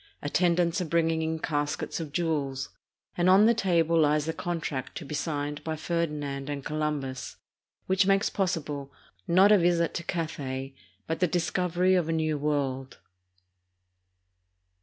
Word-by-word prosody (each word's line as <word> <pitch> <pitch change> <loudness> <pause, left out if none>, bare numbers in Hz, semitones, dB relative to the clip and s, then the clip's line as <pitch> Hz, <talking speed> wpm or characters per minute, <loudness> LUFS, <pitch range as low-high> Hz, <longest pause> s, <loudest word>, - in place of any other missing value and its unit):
Attendants 170 +3 +2
are - - -1
bringing 165 0 +1
in 160 0 -1
caskets 150 0 -2
of 160 -3 -5
jewels, 145 -5 -1 0.5
and 175 +1 +2
on 195 +3 +7
the 230 - +6
table 170 -6 +2
lies 150 -1 +3
the 160 - -2
contract 160 -7 -4
to 165 - -7
be 140 - -7
signed 145 -1 -3
by 160 -1 -2
Ferdinand 150 -4 -3
and 140 -2 -4
Colum 150 -1 -1
bus 130 -1 -6 0.5
which 190 +1 +2
makes 195 0 +3
possible, 150 -7 -2 0.4
not 190 +4 +6
a 210 - +7
visit 170 -1 +2
to 170 - -4
Cathay, 140 -6 -4 0.3
but 160 - -3
the 180 - +3
discovery 180 +2 +1
of 175 -3 +2
a - - +1
New 155 -1 0
World. 135 -3 -2
160 Hz, 150 wpm, -28 LUFS, 145-175 Hz, 0.5 s, on